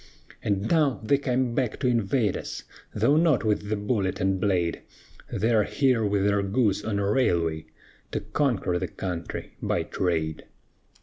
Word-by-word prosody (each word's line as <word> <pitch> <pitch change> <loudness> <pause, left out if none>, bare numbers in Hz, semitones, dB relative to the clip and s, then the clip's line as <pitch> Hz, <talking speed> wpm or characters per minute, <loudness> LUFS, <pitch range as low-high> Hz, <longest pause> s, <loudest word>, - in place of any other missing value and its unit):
And 100 0 0
now 150 -6 +2
they 140 +5 +3
come 130 -3 0
back 120 -2 -1
to 130 - +2
invade 115 -2 +1
us, - - -6 0.3
Though 145 - +3
not 160 -6 +3
with 105 -1 0
the 110 - +1
bullet 100 -2 -1
and 95 -1 0
blade; 90 -4 +1 0.5
They 115 +4 +1
are 110 - +5
here 130 -3 +2
with 100 -1 +1
their 100 0 +2
goods 105 0 +1
on 110 -2 -1
a 100 -1 0
railway, 85 -9 +1 0.4
To - - -2
conquer 105 -5 0
the - - -2
country 90 -3 -5
by - - 0
trade." 80 -4 -2
105 Hz, 165 wpm, -26 LUFS, 95-125 Hz, 0.5 s, are